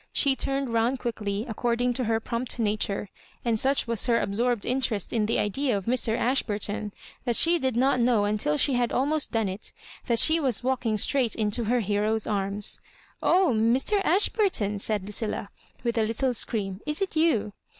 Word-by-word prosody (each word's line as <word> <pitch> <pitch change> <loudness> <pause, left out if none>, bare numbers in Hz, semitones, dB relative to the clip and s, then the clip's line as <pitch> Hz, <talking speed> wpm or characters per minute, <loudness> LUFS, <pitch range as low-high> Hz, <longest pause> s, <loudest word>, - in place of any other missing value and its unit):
She 275 -2 +2
turned 270 -2 -1
round 230 +3 +1
quickly, 215 -3 -3
according 240 +2 -1
to 250 0 -2
her 225 0 +1
prompt 235 +3 -4
nature; 210 -2 -1 0.4
and 230 -2 +1
such 270 +3 +2
was 230 0 0
her 230 -1 +3
absorbed 235 +2 -1
interest 240 -6 -1
in 215 -3 +1
the 230 - 0
idea 240 +3 0
of 195 - -6
Mr. 235 -2 +1
Ashburton, 210 -4 -1 0.3
that 240 -2 +1
she 340 +6 +5
did 260 -4 -1
not 255 +1 +2
know 235 -4 +2
until 205 -8 0
she 275 - +1
had 245 -1 0
almost 290 +3 0
done 225 -2 0
it, 190 +3 -6 0.4
thai 235 - +2
she 315 +8 +5
was 255 -7 0
walking 245 -4 0
straight 250 +2 +2
into 220 +1 0
her 240 +2 +1
hero's 210 +1 0
anps. 200 0 -1 0.4
'<0h. 235 -12 +3
Mr. 400 +10 +1
Ashburton 380 - +2
I" - - -4
said 205 0 -1
Lucilla, 210 0 -2 0.3
with 235 -1 0
a - - +3
little 230 +4 0
scream, 205 -4 -2
" - - -29
is 300 +1 0
it 380 - -5
you 310 -11 +1
230 Hz, 185 wpm, -26 LUFS, 210-260 Hz, 0.4 s, she